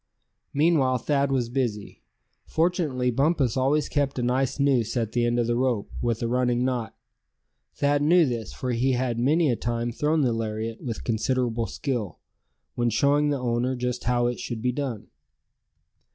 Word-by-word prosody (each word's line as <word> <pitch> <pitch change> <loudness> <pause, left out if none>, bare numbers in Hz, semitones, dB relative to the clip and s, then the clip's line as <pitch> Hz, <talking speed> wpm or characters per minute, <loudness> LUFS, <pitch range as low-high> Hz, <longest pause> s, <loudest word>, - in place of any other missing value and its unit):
Meanwhile 145 -4 +3
Thad 140 +2 0
was 125 -3 +1
busy. 115 -5 -3 0.5
Fortunately 160 -7 0
Bumpus 135 -1 +1
always 140 +3 +2
kept 140 -2 -1
a 125 - -1
nice 130 +2 0
noose 130 -5 +2
at 115 -2 -1
the 120 -1 +1
end 120 0 0
of 120 - +2
the 120 +1 0
rope, 120 -4 0
with 120 -1 -1
a - - 0
running 125 0 +1
knot. 125 -5 -2 0.8
Thad 145 0 +1
knew 170 +3 +5
this, 120 -5 -3
for 125 - -4
he 125 +3 +1
had 120 -2 -1
many 150 +4 +3
a - - +1
time 120 +1 -2
thrown 150 +6 +1
the 125 -4 +2
lariat 110 0 -3
with 115 -4 -5
considerable 115 0 0
skill, 120 - -3 0.6
when 120 0 0
showing 140 +6 +2
the 145 - 0
owner 125 +1 -1
just 125 0 -3
how 120 0 +2
it 120 0 -1
should 115 -2 -5
be 125 - +2
done. 125 -5 -4
125 Hz, 170 wpm, -25 LUFS, 120-140 Hz, 0.8 s, knew